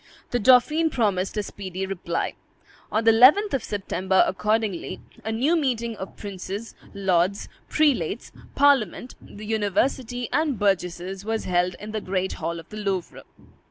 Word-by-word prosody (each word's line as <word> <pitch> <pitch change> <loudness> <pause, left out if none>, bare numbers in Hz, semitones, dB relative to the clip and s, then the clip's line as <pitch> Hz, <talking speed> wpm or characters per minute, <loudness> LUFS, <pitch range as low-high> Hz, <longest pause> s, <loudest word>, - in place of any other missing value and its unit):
The 245 - +1
dauphin 260 +8 +5
promised 205 -7 0
a 210 - 0
speedy 190 -2 -5
reply. 175 -3 -3 0.6
On 220 - +1
the 225 - +6
11th 275 - +6
of 270 - 0
September, 190 -2 +1
accordingly, 210 -1 -1 0.2
a 220 - -3
new 265 +10 +2
meeting 240 -7 -1
of 190 - -8
princes, 200 +2 -6 0.2
lords, 190 0 +1 0.2
prelates, 300 -4 +1 0.2
parliament, 265 -5 +2
the 210 +1 -11
university, 225 +3 0
and 300 -5 +1
burgesses 190 -1 -1
was 225 +1 -2
held 180 0 +1
in 210 +1 -7
the 215 0 -3
great 190 0 -2
hall 170 0 -4
of 165 - -13
the 215 - -8
Louvre. 195 -4 -3
210 Hz, 145 wpm, -24 LUFS, 190-245 Hz, 0.6 s, the